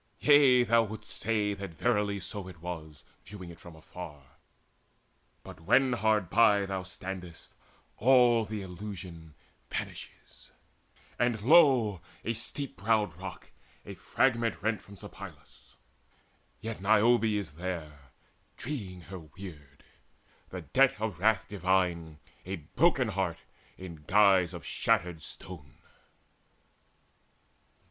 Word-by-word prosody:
Yea, 140 -4 +6
thou 115 -1 +4
wouldst 110 -1 -6
say 105 -1 0
that 100 -4 -7
verily 105 -1 +1
so 95 +1 -5
it 90 -3 -11
was, 80 -4 -7 0.2
Viewing 95 -3 -9
it 85 - -14
from 85 -1 -12
afar; 75 -4 -11 1.1
but - - -11
when 130 +10 +3
hard 110 -3 +2
by 100 0 +4
Thou 95 -1 -3
standest, 90 -2 -8 0.4
all 120 -1 +5
the 105 -1 -5
illusion 90 -4 -9 0.3
vanishes; - - -7 0.7
And 120 -2 +1
lo, 130 - +5 0.2
a 115 - 0
steep 140 +1 -4
browed 105 -3 +1
rock, 95 +2 -9 0.3
a 100 - -7
fragment 115 +4 0
rent 110 0 0
From 100 - -14
Sipylus - - -12 0.9
yet 110 -3 -5
Niobe 110 +3 +4
is 105 -3 -1
there, 75 -5 -6 0.5
Dreeing 100 -10 -5
her 95 +2 -9
weird, 75 -3 -12 0.7
the - - -6
debt 135 -2 +3
of 105 -6 -3
wrath 110 +2 +2
divine, 90 -5 0 0.3
A 95 +2 -4
broken 125 - +1
heart 95 -4 -1 0.4
in 90 -3 -9
guise 95 -3 +4
of 85 - -9
shattered 85 -2 0
stone. 80 -4 -9
100 Hz, 115 wpm, -30 LUFS, 90-110 Hz, 1.1 s, Yea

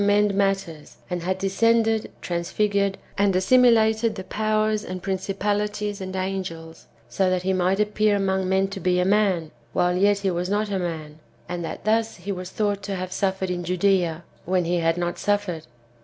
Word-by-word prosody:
end 205 0 +3
matters, 195 -6 -1
and 175 -1 -2
had 185 +2 -1
descended, 225 +3 +2
transfigured 200 +3 0 0.2
and 200 -2 +3
assimilated 225 +1 +4
to 190 - -6
powers 215 +1 0
and 185 0 -6
principalities 205 +2 -2
and 190 0 -5
angels, 185 -4 -5 0.2
so 185 +11 +1
that 185 -1 0
he 190 +1 +1
might 185 +2 +1
appear 210 0 +2
among 190 -1 0
men 190 +1 +2
to 195 0 -7
be 180 -1 +1
a 180 - +2
man, 190 -5 +2 0.2
while 180 0 +2
yet 200 +2 +3
he 195 -1 -1
was 175 +1 -2
not 205 +1 0
a 195 - 0
man; 160 -3 -5 0.3
and 175 -1 -4
that 165 - -6
thus 225 +1 +1
he 190 +3 -6
was 185 -1 -5
thought 205 0 -1
to 200 0 -4
have 185 0 -4
suffered 190 -1 -1
in 175 0 -3
Judssa, 180 -2 +1 0.2
when 180 0 0
he 175 +1 +1
had 165 0 +1
not 175 0 -2
suffered. 200 -7 -1
190 Hz, 180 wpm, -24 LUFS, 180-205 Hz, 0.3 s, assimilated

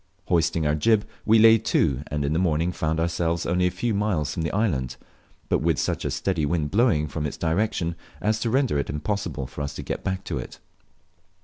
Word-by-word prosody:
Hoisting 80 -2 +2
our 75 - +2
jib, 105 +8 +2 0.2
we 110 +1 +6
lay 110 0 +7
to, 75 - +1
and 75 -1 -2
in 70 - 0
the 80 - +1
morning 85 -1 +1
found 80 -2 -1
ourselves 85 0 0
only 90 +1 +2
a - - +2
few 110 +6 -2
miles 95 -8 0
from - - -3
the 80 - -1
island, 75 - -1 0.5
but - - +2
wit, - - +1
such - - -1
a - - 0
steady 90 -5 -1
wind 75 -1 0
blowing 105 -9 +3
from 75 +1 -3
its - - -7
direction 85 0 0 0.3
as 110 +1 0
to 115 - -1
render 130 - +2
it 70 - -3
impossible 75 -1 -3
for 70 +3 -7
us 70 0 -4
to - - -6
get - - -4
back 95 0 -2
to 75 -7 -3
it. - - -8
85 Hz, 215 wpm, -25 LUFS, 75-105 Hz, 0.5 s, lay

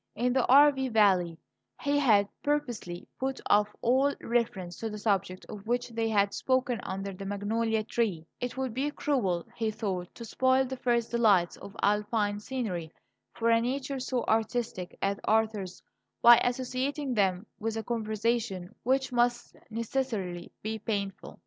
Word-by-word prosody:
In 245 +3 +1
the 260 -1 +2
Arve 275 -2 +6
valley 185 -6 +3 0.4
he 285 0 +1
had 210 -7 +4
purposely 245 -12 -2
put 265 0 -2
off 205 0 +4
all 265 +4 +3
reference 215 -7 -1
to 225 - -3
the 210 - -6
subject 195 -3 -1
of 210 0 -9
which 245 +1 0
they 225 -1 -1
had 200 -2 +2
spoken 255 -2 0
under 195 +1 -4
the 185 - -8
magnolia 215 +3 -1
tree; 210 -8 -1
it 245 +1 -4
would 260 -3 -2
be 270 +4 0
cruel, 220 - 0
he 225 -1 -1
thought, 190 -5 -3
to 235 - -8
spoil 260 +3 +2
the 260 +1 -4
first 240 -2 0
delights 205 -7 +3
of 200 - -11
Alpine 210 0 +1
scenery 205 -9 -4 0.4
for 230 0 +2
a 230 0 +4
nature 270 +2 -2
so 255 -1 -1
artistic 220 -4 -1
as 200 0 0
Arthur's 215 -4 0 0.4
by 235 0 +10
associating 255 +3 -1
them 195 -2 +1
with 225 +1 -2
a 225 - -3
conversation 220 -4 -2
which 265 +2 +1
must 240 0 +1
necessarily 220 -6 -3
be 220 +1 -3
painful. 200 -2 -4
225 Hz, 155 wpm, -29 LUFS, 200-250 Hz, 0.4 s, by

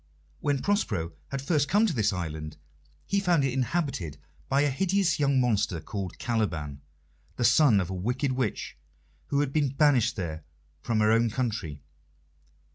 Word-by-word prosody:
When 140 -2 0
Prospero 105 - 0
had 135 -1 -4
first 145 -1 +1
come 210 +4 +4
to 200 - 0
this 110 -5 +1
island, 80 -4 -5 0.5
he 200 - +1
found 175 -7 +2
it 130 - 0
inhabited 130 - -2 0.3
by 135 +1 +3
a 145 - +3
hideous 190 +3 +1
young 140 -2 +3
monster 105 -8 +1
called 95 +2 -6
Caliban, 80 - -2 0.5
the - - -2
son 120 -2 +5
of 95 -1 -2
a - - -2
wicked 125 +9 -1
witch 130 -4 -3 0.5
who 140 0 +1
had 140 -2 -2
been 150 -3 +2
banished 135 -4 +3
there 80 -6 -4 0.4
from 110 +1 0
her 105 0 +4
own 115 +1 +3
country. 110 - -3
125 Hz, 160 wpm, -27 LUFS, 95-145 Hz, 0.5 s, son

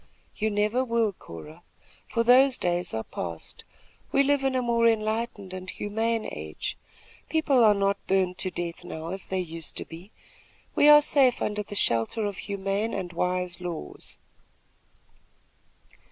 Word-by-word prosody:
"You 220 0 0
never 210 +4 +1
will, 230 -4 +1
Cora, 155 - -11 0.5
for 230 - +1
those 255 +2 +6
days 175 0 -1
are 110 0 -3
passed. 85 -5 -6 0.5
We 275 - +4
live 285 0 +2
in 265 -1 +1
a 255 - +2
more 235 -1 +3
enlightened 215 -3 -1
and 185 0 -6
humane 225 +2 -1
age. 75 0 -5 0.5
People 290 -6 +3
are 210 -2 +6
not 200 0 0
burned 185 -1 +1
to 185 - 0
death 175 -2 -5
now, 160 +1 -6
as 190 +1 -5
they 190 - -1
used 165 -3 -4
to - - -1
be. 170 +4 -11 0.6
We 295 - +5
are 295 0 +10
safe 270 -4 +3
under 210 0 -1
the 205 0 -8
shelter 120 - +1
of 200 -2 -3
humane 200 +3 -2
and 180 -3 -4
wise 180 0 -1
laws." 170 - -6
200 Hz, 155 wpm, -27 LUFS, 180-230 Hz, 0.6 s, are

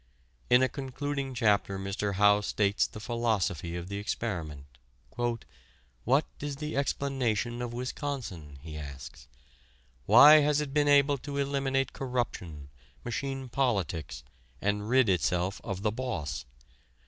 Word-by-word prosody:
In 125 +1 +6
a - - +4
concluding 135 0 -4
chapter 100 -4 +2
Mr. 100 +1 -3
Howe 105 +1 +5
states 100 0 +1
the - - -10
philosophy 105 - -1
of 85 0 -5
the 100 +1 -4
experiment. 85 -9 -4 0.5
"What 110 - -2
is 145 -1 -4
the 150 +2 -5
explanation 125 -4 -1
of 120 -1 -3
Wisconsin?" 120 - -5
he 75 -1 -7
asks. 70 -3 -9 0.8
"Why 145 +9 +9
has 150 0 +3
it 145 -2 -3
been 145 -1 +2
able 140 -1 +4
to 140 +2 -6
eliminate 135 -1 0
corruption, 90 - -4 0.4
machine 135 +2 -3
politics, 100 - -1 0.4
and 105 +1 -1
rid 130 -1 +4
itself 90 +1 0
of 100 0 -5
the 105 - +2
boss? 90 - -4
115 Hz, 125 wpm, -29 LUFS, 95-135 Hz, 0.8 s, Why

